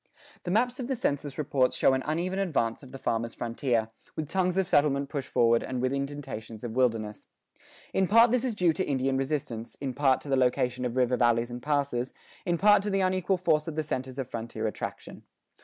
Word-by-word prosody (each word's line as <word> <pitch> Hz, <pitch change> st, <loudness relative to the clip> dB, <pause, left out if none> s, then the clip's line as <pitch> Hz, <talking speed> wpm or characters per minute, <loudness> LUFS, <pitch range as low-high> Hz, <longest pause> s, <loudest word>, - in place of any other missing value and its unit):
The -, -, -2 dB
maps 245 Hz, +6 st, +1 dB
of 250 Hz, -, -3 dB
the 265 Hz, -, -1 dB
census 145 Hz, -, -2 dB
reports 135 Hz, -4 st, +1 dB
show -, -, +4 dB
an 130 Hz, -, +1 dB
uneven 175 Hz, +5 st, -1 dB
advance 140 Hz, -12 st, 0 dB
of 135 Hz, -3 st, -13 dB
the 135 Hz, -, -7 dB
farmer's 115 Hz, -2 st, -2 dB
frontier, 115 Hz, -1 st, -1 dB, 0.2 s
with 155 Hz, -, -3 dB
tongues 185 Hz, +1 st, 0 dB
of 190 Hz, -2 st, +2 dB
settlement 140 Hz, -2 st, +2 dB
pushed 140 Hz, -3 st, -4 dB
forward 115 Hz, 0 st, +3 dB
and 130 Hz, -1 st, -4 dB
with 130 Hz, +2 st, 0 dB
indentations 140 Hz, -6 st, -5 dB
of 120 Hz, -, -4 dB
wilderness. 115 Hz, -5 st, 0 dB, 0.7 s
In 190 Hz, -1 st, +2 dB
part 230 Hz, +3 st, +6 dB
this 250 Hz, -1 st, +2 dB
is 250 Hz, -4 st, -1 dB
due 180 Hz, -5 st, +3 dB
to 190 Hz, -, -1 dB
Indian 135 Hz, -3 st, 0 dB
resistance, 135 Hz, -4 st, -3 dB
in 135 Hz, -2 st, -3 dB
part 135 Hz, -1 st, +3 dB
to -, -, -11 dB
the 135 Hz, -, +2 dB
location 125 Hz, -1 st, +1 dB
of 120 Hz, 0 st, -3 dB
river 125 Hz, -1 st, +2 dB
valleys 120 Hz, 0 st, +2 dB
and 120 Hz, 0 st, -6 dB
passes, 140 Hz, -3 st, -1 dB, 0.3 s
in 175 Hz, -1 st, +2 dB
part 205 Hz, +2 st, +6 dB
to 205 Hz, -, -2 dB
the 195 Hz, -1 st, +1 dB
unequal 185 Hz, 0 st, +1 dB
force 160 Hz, -4 st, +1 dB
of 160 Hz, -, -4 dB
the 155 Hz, -, 0 dB
centers 130 Hz, -3 st, -4 dB
of 135 Hz, -3 st, -3 dB
frontier 115 Hz, -1 st, -5 dB
attraction. -, -, -5 dB
140 Hz, 210 wpm, -28 LUFS, 125-175 Hz, 0.7 s, part